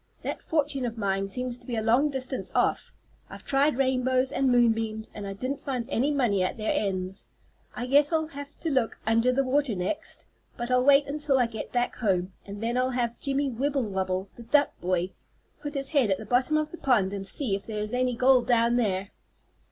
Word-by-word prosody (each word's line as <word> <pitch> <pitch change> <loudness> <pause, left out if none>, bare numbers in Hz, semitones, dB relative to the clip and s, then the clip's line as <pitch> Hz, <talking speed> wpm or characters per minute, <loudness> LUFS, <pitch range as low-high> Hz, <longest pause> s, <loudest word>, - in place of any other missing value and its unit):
"That - - -4
fortune 290 -4 -1
of 230 0 -6
mine 195 -2 0
seems 250 +3 -3
to - - -17
be 240 - -2
a 220 - 0
long 245 +7 +3
distance 265 -1 -4
off. - - +1 0.4
I've - - -11
tried 280 0 +2
rainbows 260 -1 +1
and 270 -1 +1
moon 240 -1 +5
beams 220 -1 -4
and 205 -1 -6
I 195 - -4
didn't 255 +7 -4
find 250 -4 -3
any 265 +5 +1
money 240 -9 +1
at 185 - -2
their 215 -1 -1
ends. 190 -2 -2 0.5
I 245 - -3
guess 285 +4 +4
I'll 315 -1 0
have 285 -1 -8
to 325 - -1
look 255 -5 0
under 230 +3 +3
the 270 +2 +2
water 270 -3 +1
next, 180 - -4 0.3
but 240 +1 -3
I'll 250 0 +4
wait 280 +1 +6
until 285 -1 0
I 250 - +4
get 225 -2 -6
back 245 0 -1
home, 190 -5 0
and 205 +2 -7
then 235 +2 0
I'll 255 0 +2
have 240 -2 -2
Jimmie 275 0 0
Wibblewobble 200 -8 -1
the - - -9
duck 285 +5 +3
boy 180 +1 0 0.5
put 290 0 -6
his 275 -1 -2
head 275 -8 +2
at 190 - +2
the 220 - -8
bottom 255 +7 +2
of 305 0 -1
the 345 - -8
pond 210 -8 +2
and 195 -1 -4
see 240 -1 0
if 195 - -7
there 220 -2 -4
is 210 +2 -3
any 250 0 +1
gold 255 0 +4
down 235 0 +3
there." 200 -4 0
245 Hz, 215 wpm, -27 LUFS, 215-275 Hz, 0.5 s, wait